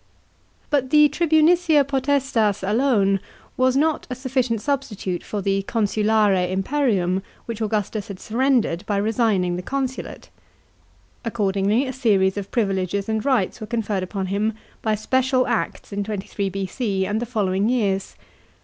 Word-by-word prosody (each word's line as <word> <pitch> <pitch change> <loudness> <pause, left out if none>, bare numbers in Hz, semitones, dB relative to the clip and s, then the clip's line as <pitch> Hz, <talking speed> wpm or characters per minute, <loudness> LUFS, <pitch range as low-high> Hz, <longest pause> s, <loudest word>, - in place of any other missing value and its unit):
But 270 -3 +1
the 300 +1 +6
tribunicia 320 0 +4
potestas 270 -7 0
alone 205 -4 +2 0.4
was 255 +1 +2
not 310 +2 +1
a 250 - -3
sufficient 255 -3 -1
substitute 220 -8 -3
for 205 -2 -4
the 195 0 +1
consulare 210 -3 +2
imperium 195 -4 +1 0.2
which 230 -1 -5
Augustus 210 -1 -2
had 195 -2 -8
surrendered 235 -6 +1
by 205 - 0
resigning 205 -4 +1
the - - -3
consulate. 265 +5 -4 0.9
Accordingly 205 +1 +1
a 260 - -4
series 200 -7 +2
of 200 -1 -5
privileges 195 -3 -1
and 220 -1 -1
rights 250 -6 0
were 215 - -5
conferred 215 -4 -1
upon 190 +1 -3
him 215 +2 0 0.3
by 220 -1 +1
special 255 +4 +1
acts 230 -3 -2
in 200 0 -1
23 200 -1 -3
B.C. 195 +1 -2
and 210 +3 -1
the 240 - -3
following 205 -3 0
years. 200 -6 0
215 Hz, 140 wpm, -22 LUFS, 195-260 Hz, 0.9 s, the